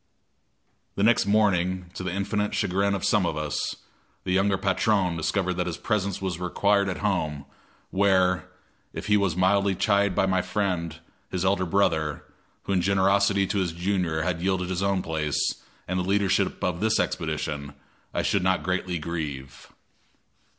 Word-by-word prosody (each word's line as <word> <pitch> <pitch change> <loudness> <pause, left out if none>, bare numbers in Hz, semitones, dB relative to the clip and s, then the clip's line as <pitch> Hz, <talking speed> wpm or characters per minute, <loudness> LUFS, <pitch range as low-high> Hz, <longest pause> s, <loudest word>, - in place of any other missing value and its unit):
The 100 - 0
next 115 -2 +4
morning, 95 -4 +1
to - - -6
the 90 -1 -3
infinite 105 +2 -1
chagrin 100 +2 +1
of 95 - -3
some 105 - +3
of 80 -3 -1
us, 75 -2 -2 0.5
the - - -3
younger 95 +1 +2
patron 95 -2 +1
discovered 80 - -1
that - - -1
his - - -3
presence 100 -2 -1
was 95 -3 -3
required 100 +2 +1
at 95 - -3
home, 75 -8 -1 0.5
where, 95 -3 +2 0.4
if - - -6
he 105 - +3
was 100 -5 +1
mildly 95 +1 +2
chid 100 -1 +2
by - - +3
my 95 -1 +1
friend, 90 -4 -2 0.3
his 90 0 -2
elder 95 -1 +1
brother, 80 -5 +1 0.4
who 100 - -2
in 90 - +2
generosity 100 +1 +3
to 100 +1 -1
his 90 -3 -1
junior 85 -3 -1
had 85 -1 -2
yielded 95 -1 0
his 90 0 -1
own 95 -1 +1
place 80 -3 -1 0.5
and 95 0 -1
the - - 0
leadership 100 +1 +1
of 90 -2 -1
this 110 +1 +2
expedition, 75 -3 -2 0.4
I - - -1
should 100 - +1
not 95 0 +1
greatly 90 -1 -1
grieve. 75 -5 -6
95 Hz, 165 wpm, -26 LUFS, 85-100 Hz, 0.5 s, next